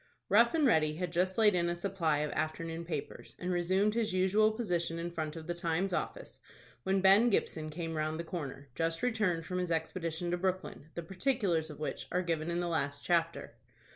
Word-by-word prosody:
Rough - - +5
and 310 -3 +3
Ready 155 - +3
had 175 +1 -3
just 185 +2 +1
laid 215 -2 +6
in 170 -1 +2
a 175 - -1
supply 170 -5 0
of 150 -1 -2
afternoon 165 +1 -3
papers, 155 -4 -6
and 180 +1 -3
resumed 185 +4 +2
his 225 -4 0
usual 190 +4 +4
position 175 -7 -1
in 170 +1 -4
front 155 -2 -4
of 160 -1 -7
the 175 - -2
"Times" 175 +2 -1
office, - - -4 0.4
when 190 +7 +1
Ben 195 +5 +6
Gibson 155 -7 0
came 165 +1 -4
round 155 0 -2
the - - -2
corner, 145 -5 -6
just 165 - -1
returned 210 -9 +1
from 180 +1 -2
his 180 -1 -2
expedition 165 +1 -2
to 175 - +1
Brooklyn, 185 -4 -3
the 170 - -4
particulars 185 - 0
of 150 - -9
which 150 - -4
are 180 +1 +1
given 165 -1 -1
in 170 0 -1
the 175 - -1
last 145 -4 -2
chapter. 170 -1 0
170 Hz, 200 wpm, -32 LUFS, 160-190 Hz, 0.4 s, laid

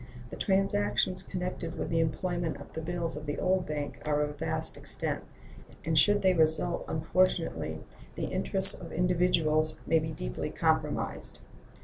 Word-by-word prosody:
The - - -5
transactions 185 - +1
connected 180 -2 -4
with - - -3
the 165 - +2
employment 170 +1 -1
of - - -12
the 160 - -4
bills 170 0 -3
of 150 0 -7
the 145 - -2
old 185 0 +1
bank 150 -1 -4
are 150 -1 +1
of 150 -1 -3
vast 160 0 0
extent, - - -2 0.6
and 160 0 +1
should 205 +6 +4
they 190 -1 +5
result 160 +1 +1
unfortunately 180 +4 0 0.3
the - - -2
interests 195 -1 +3
of 170 -3 -9
individuals 165 -3 +2
may 165 - +4
be 160 +1 -3
deeply - - -4
compromised. - - -1
165 Hz, 150 wpm, -30 LUFS, 155-180 Hz, 0.6 s, they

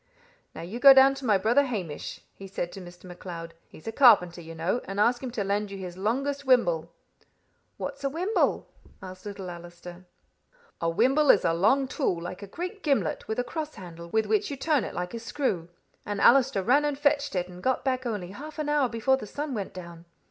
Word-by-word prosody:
"'Now - - -7
you 200 +8 -6
go 275 +1 +9
down 270 +1 +7
to 270 -1 -8
my 210 -3 +5
brother 235 +8 +3
Hamish,' 185 - -5
he 195 - -10
said 175 -2 -4
to 195 - -9
Mr. 175 0 -13
MacLeod; 175 -2 -8
'he's 155 - -16
a 225 - -3
carpenter, 190 -10 +5
you 165 0 -10
know, 170 +9 -1
and 195 +1 -5
ask 240 +3 +3
him 260 - -4
to 230 -4 -3
lend 205 +1 -1
you 195 - -7
his 180 -2 -7
longest 275 +9 -1
wimble.'" 175 - +2 0.9
"What's - - -6
a 275 - +1
wimble?" 360 +9 0 0.4
asked 185 +1 -9
little 200 -2 -7
Allister. 175 +1 -11 0.8
"A 165 - +1
wimble 265 - +3
is - - +6
a 165 - +3
long 220 +11 +3
tool, 255 - -1
like 180 +3 -7
a 200 - -8
great 365 - -6
gimlet, 230 - 0
with 220 - -3
a 245 - +1
cross 305 +5 -5
handle, 170 -4 -10
with 220 +4 +1
which 420 -1 +1
you 280 - -5
turn 300 -2 +1
it - - -6
like 180 +3 -4
a 230 - -4
screw. 225 - -2 0.3
And 205 -1 -4
Allister 250 -5 +4
ran 275 +8 +4
and 295 -2 -1
fetched 285 -4 +1
it, 180 -1 -1
and 180 0 -12
got 260 +4 0
back 260 -1 0
only 200 -6 -4
half 300 +9 -9
an 305 -1 -2
hour 295 -4 +2
before 245 +4 +1
the 215 - -8
sun 290 +5 -4
went 205 -5 -4
down. 170 -2 -10
215 Hz, 215 wpm, -27 LUFS, 180-270 Hz, 0.9 s, go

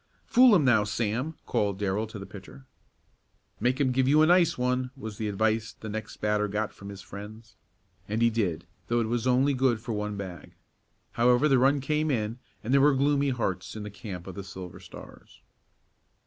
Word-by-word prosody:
"Fool 250 -2 +6
him 155 -7 +3
now, 115 -5 +4
Sam," 115 +8 -2
called 100 -2 0
Darrell 105 +2 -1
to 110 0 -9
the 100 - -7
pitcher. 105 +8 -12 0.9
"Make 125 +4 +1
him 135 -3 +2
give 130 +1 +1
you 150 +3 +5
a - - +6
nice 175 0 +4
one," 125 +1 0
was 110 -5 -8
the 110 - -1
advice 110 +1 0
the 110 - -9
next 110 0 -6
batter 105 0 0
got 105 +1 -2
from 100 - -10
his 100 -1 -9
friends. 110 +3 -10 0.5
And 105 +2 -1
he 115 - +4
did, 90 -7 -1 0.2
though 120 +1 +1
it 115 - 0
was 120 +1 -1
only 130 +3 +3
good 130 -3 +2
for 115 +1 -5
one 105 -1 -3
bag. 90 -6 -8 0.6
However, 125 +4 +3
the 135 -3 +4
run 135 +2 +3
came 150 +3 0
in, 115 -2 -1 0.2
and 120 +4 -1
there 140 - +5
were 145 0 +5
gloomy 140 +1 +2
hearts 105 -8 -3
in 110 - -6
the 105 - -7
camp 95 -4 -8
of 95 - -7
the 100 - -7
Silver 95 -1 -9
Stars. 90 - -14
110 Hz, 200 wpm, -27 LUFS, 105-130 Hz, 0.9 s, Fool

